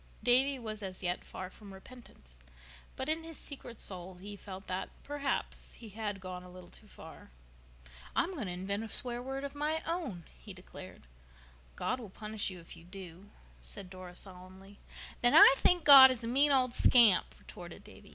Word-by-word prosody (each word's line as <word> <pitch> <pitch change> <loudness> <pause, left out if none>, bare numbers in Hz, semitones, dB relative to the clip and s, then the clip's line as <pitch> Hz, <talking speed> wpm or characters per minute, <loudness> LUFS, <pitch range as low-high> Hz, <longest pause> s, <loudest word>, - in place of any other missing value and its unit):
Davy 265 +3 +3
was 215 -3 -7
as 190 -1 -7
yet 180 0 -2
far 185 0 -8
from 205 0 -14
repentance, 190 - -15 0.6
but 265 - -4
in 320 +1 -1
his 325 -1 -9
secret 245 -5 -9
soul 185 -1 -5
he 200 +3 -9
felt 195 0 -10
that, 185 +1 -4
perhaps, 285 -1 -4
he 230 - -12
had 205 -1 -5
gone 185 -1 -7
a 180 - -13
little 180 -1 -13
too - - -14
far. - - -14 0.9
"I'm 375 - 0
going 255 - -5
to - - -4
invent 195 +4 -4
a - - -6
swear 240 +2 -3
word 270 +2 -5
of 280 - -6
my 305 +2 -2
own," 305 - -4
he - - -12
declared. - - -12 0.7
"God 255 - -2
will 225 -5 -9
punish 215 +2 -4
you 185 -2 -10
if 165 - -13
you - - -15
do," 185 +1 -11 0.3
said 195 -3 -9
Dora 185 -1 -10
solemnly. 190 +2 -12 0.4
"Then 245 0 +3
I - - +10
think 355 -2 +2
God 270 -2 +12
is 255 -3 -3
a - - -4
mean 280 +5 +3
old 255 -3 +3
scamp," 210 - +4
retorted - - -12
Davy. - - -15
205 Hz, 185 wpm, -32 LUFS, 185-260 Hz, 0.9 s, God